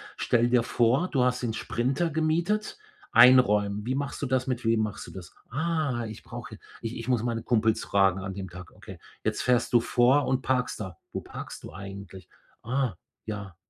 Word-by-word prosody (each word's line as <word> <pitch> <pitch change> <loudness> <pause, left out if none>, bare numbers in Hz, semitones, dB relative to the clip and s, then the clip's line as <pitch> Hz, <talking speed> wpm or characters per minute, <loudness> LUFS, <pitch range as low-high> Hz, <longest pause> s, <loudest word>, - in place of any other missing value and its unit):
„Stell 120 0 +2
dir 120 -2 +3
vor, 125 +12 +2
du 130 -4 +2
hast 125 0 0
den 115 -2 -1
Sprinter 130 +10 -1
gemietet. 170 - 0 0.4
Einräumen 105 -5 +6
wie 130 +2 -1
machst 140 0 -3
du 140 - -1
das? 130 0 +1
Mit 125 -1 -2
wem 115 0 +2
machst 105 -1 -4
du - - -10
das?“ 90 -2 -11
„Ah, 145 -4 -1
ich 110 - -9
brauche - - -8
hier - - -10 0.2
ich 115 +1 -4
ich 115 +1 -7
muss 120 -3 +1
meine 115 -1 -1
Kumpels 110 -2 +2
fragen 95 -1 +2
an 95 0 -5
dem 95 -1 -6
Tag.“ 90 0 -11
Okay. - - -12 0.2
„Jetzt - - -1
fährst 125 -1 +1
du 120 - +7
vor 125 +4 +3
und 130 0 +1
parkst 125 -3 0
da. 95 -5 -6
Wo - - -3
parkst - - -9
du - - -9
eigentlich?“ 95 -2 -9 0.3
„Ah, 125 -2 0 0.3
ja. 100 -4 -6
120 Hz, 195 wpm, -27 LUFS, 105-130 Hz, 0.4 s, du